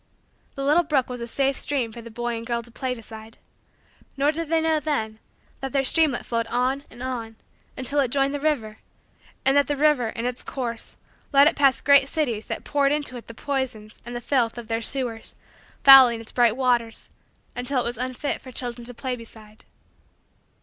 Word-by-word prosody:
The 275 Hz, -, -4 dB
little 300 Hz, +5 st, +4 dB
brook 290 Hz, -6 st, 0 dB
was 245 Hz, -1 st, -6 dB
a 235 Hz, -, -4 dB
safe 275 Hz, +3 st, 0 dB
stream 265 Hz, -6 st, -1 dB
for 235 Hz, -, -9 dB
the 230 Hz, -, -10 dB
boy 240 Hz, +1 st, -3 dB
and 225 Hz, -, -5 dB
the -, -, -10 dB
girl 235 Hz, -1 st, -1 dB
to 235 Hz, -, -14 dB
play 255 Hz, +1 st, -3 dB
beside. 220 Hz, -1 st, -11 dB, 0.8 s
Nor 285 Hz, +2 st, +3 dB
did 330 Hz, +1 st, -4 dB
they 325 Hz, +1 st, +2 dB
know, 320 Hz, -1 st, +2 dB
then, 220 Hz, -8 st, -2 dB, 0.4 s
that 270 Hz, -1 st, -5 dB
their 275 Hz, -1 st, +2 dB
streamlet 300 Hz, -2 st, +2 dB
flowed 230 Hz, -1 st, -1 dB
on 255 Hz, +4 st, 0 dB
and 240 Hz, -, -10 dB
on 235 Hz, -4 st, -4 dB, 0.4 s
until 280 Hz, +3 st, -1 dB
it 265 Hz, -3 st, +2 dB
joined 275 Hz, +2 st, +1 dB
the 290 Hz, -, -2 dB
river; 255 Hz, -8 st, -1 dB, 0.7 s
and 270 Hz, +1 st, +5 dB
that 285 Hz, 0 st, +4 dB
the 290 Hz, -, -1 dB
river, 290 Hz, -5 st, +3 dB
in 230 Hz, +1 st, -5 dB
its 250 Hz, 0 st, -3 dB
course, 235 Hz, -4 st, -5 dB, 0.3 s
led 280 Hz, -1 st, +7 dB
it 310 Hz, -, +3 dB
past 275 Hz, -2 st, +2 dB
great 280 Hz, -1 st, +6 dB
cities 245 Hz, -9 st, -2 dB
that -, -, -4 dB
poured 280 Hz, -1 st, +1 dB
into 290 Hz, -3 st, -1 dB
it 240 Hz, -, -9 dB
the 230 Hz, -, -10 dB
poisons 250 Hz, -6 st, -4 dB
and 240 Hz, +1 st, -8 dB
the 240 Hz, -, -4 dB
filth 245 Hz, -3 st, 0 dB
of 235 Hz, -1 st, -8 dB
their 225 Hz, 0 st, -1 dB
sewers, 235 Hz, -2 st, -2 dB, 0.5 s
fouling 260 Hz, -4 st, +9 dB
its 225 Hz, -, -7 dB
bright 240 Hz, -2 st, +3 dB
waters, 240 Hz, -3 st, 0 dB, 0.4 s
until 250 Hz, +2 st, -1 dB
it -, -, -1 dB
was 235 Hz, -1 st, -3 dB
unfit 255 Hz, +3 st, -3 dB
for 255 Hz, -, -11 dB
children 240 Hz, -1 st, -4 dB
to 245 Hz, 0 st, -5 dB
play 255 Hz, +1 st, -3 dB
beside. 220 Hz, -2 st, -13 dB
250 Hz, 205 wpm, -24 LUFS, 230-280 Hz, 0.8 s, fouling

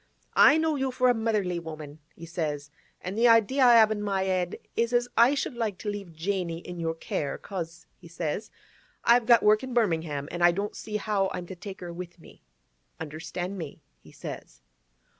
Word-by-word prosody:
—"I 300 Hz, -, +7 dB
know 320 Hz, -2 st, +1 dB
you 265 Hz, -1 st, 0 dB
for 255 Hz, 0 st, +3 dB
a -, -, +3 dB
motherly 210 Hz, -6 st, 0 dB
woman," 155 Hz, -2 st, -9 dB, 0.2 s
he 170 Hz, -, -10 dB
says, 150 Hz, -4 st, -4 dB, 0.3 s
"an' 180 Hz, -, -4 dB
the 230 Hz, +3 st, +4 dB
idea 230 Hz, +4 st, +4 dB
I 240 Hz, -1 st, +8 dB
have 220 Hz, -1 st, +7 dB
in 210 Hz, -1 st, -2 dB
my 195 Hz, -2 st, 0 dB
'ed 185 Hz, -2 st, 0 dB, 0.2 s
is 235 Hz, +1 st, 0 dB
as 240 Hz, 0 st, +2 dB
I 240 Hz, +5 st, +5 dB
should 275 Hz, -, -2 dB
like 225 Hz, -5 st, -2 dB
to 210 Hz, -, -3 dB
leave 200 Hz, -4 st, -7 dB
Janey 170 Hz, 0 st, -2 dB
in 175 Hz, +1 st, -8 dB
your 165 Hz, -1 st, -1 dB
care, 145 Hz, -3 st, -3 dB
'cause," 165 Hz, -4 st, -7 dB
he -, -, -15 dB
says, 170 Hz, +4 st, -4 dB, 0.5 s
"I've 235 Hz, -1 st, +4 dB
got 235 Hz, -2 st, +6 dB
work 215 Hz, 0 st, +5 dB
in 260 Hz, -2 st, -6 dB
Birmingham, 160 Hz, -10 st, 0 dB
an' 175 Hz, -, -5 dB
I 175 Hz, 0 st, +6 dB
don't 200 Hz, +3 st, -3 dB
see 210 Hz, -1 st, -4 dB
how 200 Hz, -2 st, 0 dB
I'm 180 Hz, -1 st, -5 dB
to 190 Hz, -, -8 dB
take 195 Hz, +2 st, -9 dB
her 175 Hz, -1 st, -6 dB
with 175 Hz, 0 st, -8 dB
me. -, -, -17 dB, 0.6 s
Understand 160 Hz, +5 st, -5 dB
me?" 155 Hz, -4 st, -8 dB, 0.2 s
he -, -, -17 dB
says. 60 Hz, -, -9 dB
190 Hz, 200 wpm, -27 LUFS, 165-225 Hz, 0.6 s, I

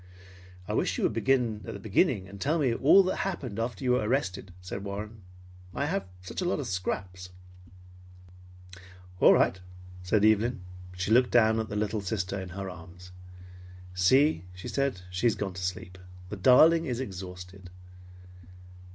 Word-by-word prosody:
"I -, -, -3 dB
wish -, -, 0 dB
you -, -, -2 dB
would -, -, +1 dB
begin 115 Hz, -1 st, +1 dB
at -, -, -7 dB
the -, -, -7 dB
beginning 95 Hz, -1 st, +1 dB
and 100 Hz, 0 st, -12 dB
tell 155 Hz, +4 st, +1 dB
me 135 Hz, -7 st, +1 dB
all 150 Hz, +11 st, +6 dB
that 185 Hz, -, -2 dB
happened 135 Hz, -, -4 dB
after 115 Hz, -1 st, -3 dB
you 125 Hz, -, +2 dB
were 125 Hz, -, +3 dB
arrested," 100 Hz, -5 st, -2 dB
said 90 Hz, +2 st, -7 dB
Warren. 105 Hz, +2 st, -6 dB, 0.5 s
"I -, -, -1 dB
have 100 Hz, -, -1 dB
had 95 Hz, -, -19 dB
such 95 Hz, -, -6 dB
a -, -, -1 dB
lot 175 Hz, -, 0 dB
of 140 Hz, -, -4 dB
scraps." 95 Hz, -2 st, -4 dB, 1.9 s
"All -, -, +7 dB
right," 95 Hz, -, +2 dB, 0.4 s
said 100 Hz, +3 st, +2 dB
Evelyn. 110 Hz, 0 st, +2 dB, 0.4 s
She 95 Hz, +3 st, -2 dB
looked 125 Hz, +2 st, +5 dB
down 110 Hz, -2 st, +4 dB
at 110 Hz, -, -3 dB
the 105 Hz, -, -5 dB
little 105 Hz, 0 st, -1 dB
sister 100 Hz, -1 st, -3 dB
in 95 Hz, -, -8 dB
her 95 Hz, +2 st, -6 dB
arms. 90 Hz, 0 st, -11 dB, 0.8 s
"See," 90 Hz, -, +3 dB
she 90 Hz, -, -8 dB
said, 140 Hz, -9 st, -1 dB
"she 95 Hz, +6 st, +1 dB
has 115 Hz, -, +2 dB
gone 100 Hz, -2 st, -4 dB
to 95 Hz, -, -7 dB
sleep. 90 Hz, 0 st, -5 dB, 0.3 s
The 105 Hz, -, -5 dB
darling 155 Hz, -, +5 dB
is 125 Hz, -2 st, -2 dB
exhausted." 90 Hz, -4 st, -8 dB
100 Hz, 170 wpm, -28 LUFS, 95-125 Hz, 1.9 s, All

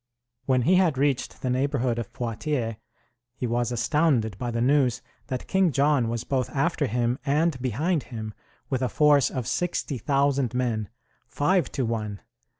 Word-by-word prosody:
When 130 Hz, -2 st, +3 dB
he 180 Hz, +6 st, +4 dB
had 175 Hz, -7 st, +3 dB
reached 140 Hz, -1 st, -1 dB
the 130 Hz, -, 0 dB
neighborhood 130 Hz, -2 st, 0 dB
of 120 Hz, 0 st, -6 dB
Poitiers, 115 Hz, 0 st, -2 dB, 0.6 s
he 125 Hz, -, -3 dB
was 120 Hz, 0 st, 0 dB
astounded 120 Hz, -, +1 dB
by 125 Hz, -, -2 dB
the 115 Hz, 0 st, -2 dB
news 125 Hz, -1 st, +2 dB, 0.2 s
that 130 Hz, -3 st, -4 dB
King 190 Hz, -3 st, +2 dB
John 140 Hz, -3 st, +2 dB
was 115 Hz, -1 st, -2 dB
both 130 Hz, -2 st, -1 dB
after 150 Hz, 0 st, +1 dB
him 120 Hz, +2 st, 0 dB
and 145 Hz, -1 st, +1 dB
behind 145 Hz, -, 0 dB
him, 110 Hz, -3 st, -6 dB, 0.3 s
with 130 Hz, -2 st, -1 dB
a 130 Hz, -, +1 dB
force 145 Hz, -2 st, +4 dB
of 130 Hz, -3 st, -4 dB
60,000 140 Hz, -5 st, 0 dB
men 115 Hz, -5 st, -1 dB, 0.4 s
five 175 Hz, +2 st, +1 dB
to 130 Hz, -, 0 dB
one! 105 Hz, -3 st, -3 dB
130 Hz, 155 wpm, -26 LUFS, 120-145 Hz, 0.6 s, he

